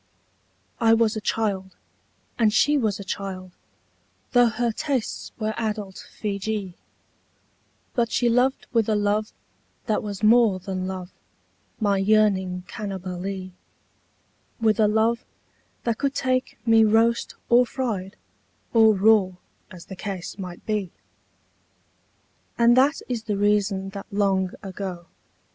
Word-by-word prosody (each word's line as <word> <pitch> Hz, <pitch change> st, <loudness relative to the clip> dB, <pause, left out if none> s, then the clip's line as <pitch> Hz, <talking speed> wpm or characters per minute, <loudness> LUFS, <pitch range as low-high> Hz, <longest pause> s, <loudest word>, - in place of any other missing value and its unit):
I 225 Hz, -2 st, +5 dB
was 225 Hz, -1 st, +2 dB
a 215 Hz, -, -3 dB
child, 195 Hz, -4 st, -2 dB, 0.6 s
and 220 Hz, -2 st, +4 dB
she 290 Hz, +7 st, +3 dB
was 215 Hz, -8 st, 0 dB
a -, -, -6 dB
child 185 Hz, -1 st, -5 dB, 0.4 s
— -, -, -41 dB
Tho' 245 Hz, -1 st, +5 dB
her 235 Hz, +1 st, 0 dB
tastes 260 Hz, +1 st, -3 dB
were 220 Hz, -1 st, -2 dB
adult 210 Hz, -4 st, -4 dB
Feejee 205 Hz, -2 st, -3 dB, 0.6 s
— -, -, -41 dB
But 235 Hz, -2 st, +1 dB
she 245 Hz, -, +2 dB
loved 250 Hz, +3 st, +2 dB
with 225 Hz, -2 st, +2 dB
a 215 Hz, -, +2 dB
love 210 Hz, +1 st, 0 dB, 0.5 s
that 220 Hz, -3 st, 0 dB
was 205 Hz, -1 st, -6 dB
more 220 Hz, -3 st, +5 dB
than 185 Hz, 0 st, -4 dB
love, 185 Hz, -1 st, -6 dB, 0.7 s
My 200 Hz, -3 st, +2 dB
yearning 195 Hz, -3 st, +2 dB
Cannibalee; 190 Hz, -2 st, -5 dB, 1.1 s
With 220 Hz, -2 st, +2 dB
a 215 Hz, -, +5 dB
love 220 Hz, +3 st, +1 dB, 0.6 s
that 230 Hz, -2 st, -1 dB
could 280 Hz, -1 st, -1 dB
take 255 Hz, -1 st, -1 dB
me 225 Hz, -1 st, +6 dB
roast 225 Hz, +2 st, +2 dB
or 245 Hz, +1 st, +5 dB
fried 210 Hz, -8 st, -3 dB, 0.6 s
Or 220 Hz, -2 st, +6 dB
raw, 200 Hz, -1 st, +4 dB, 0.4 s
as 180 Hz, -2 st, -12 dB
the 190 Hz, -, -9 dB
case 195 Hz, -1 st, -6 dB
might 180 Hz, -2 st, -8 dB
be. 210 Hz, -5 st, -2 dB, 1.7 s
And 235 Hz, 0 st, +5 dB
that 275 Hz, +4 st, +3 dB
is 235 Hz, -3 st, -3 dB
the 210 Hz, -3 st, -1 dB
reason 200 Hz, -1 st, +1 dB
that 195 Hz, 0 st, -8 dB
long 195 Hz, -2 st, +1 dB
ago. 185 Hz, -3 st, -6 dB
210 Hz, 130 wpm, -24 LUFS, 195-230 Hz, 1.7 s, me